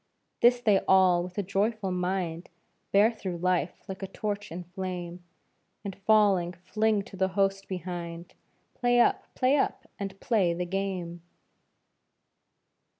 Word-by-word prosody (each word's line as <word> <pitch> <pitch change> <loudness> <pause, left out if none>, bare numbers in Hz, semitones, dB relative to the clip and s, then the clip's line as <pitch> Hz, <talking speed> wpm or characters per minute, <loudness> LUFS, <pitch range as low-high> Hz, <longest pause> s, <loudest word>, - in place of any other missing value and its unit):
This 245 +1 +6
they 210 -5 +4
all 185 -2 +5
with 180 +2 -7
a 205 - 0
joyful 200 +1 -1
mind 180 -2 -2 0.4
Bear 205 +3 +5
through 190 -6 -5
life 180 -1 -1
like 190 -1 -7
a 195 - -3
torch 205 -1 -4
in 175 +2 -5
flame, 180 -1 -6 0.6
And 195 -2 -4
falling, 200 -5 +4
fling 210 +4 0
to 195 - -12
the 190 0 +1
host 195 0 +1
behind 175 -2 -6 0.4
"Play 245 -1 +2
up! - - +2
Play 260 +3 +3
up! 270 - -1
And 195 -1 -5
play 190 -8 +1
the 180 +1 -2
game!" 180 -2 -3
190 Hz, 140 wpm, -28 LUFS, 180-205 Hz, 0.6 s, This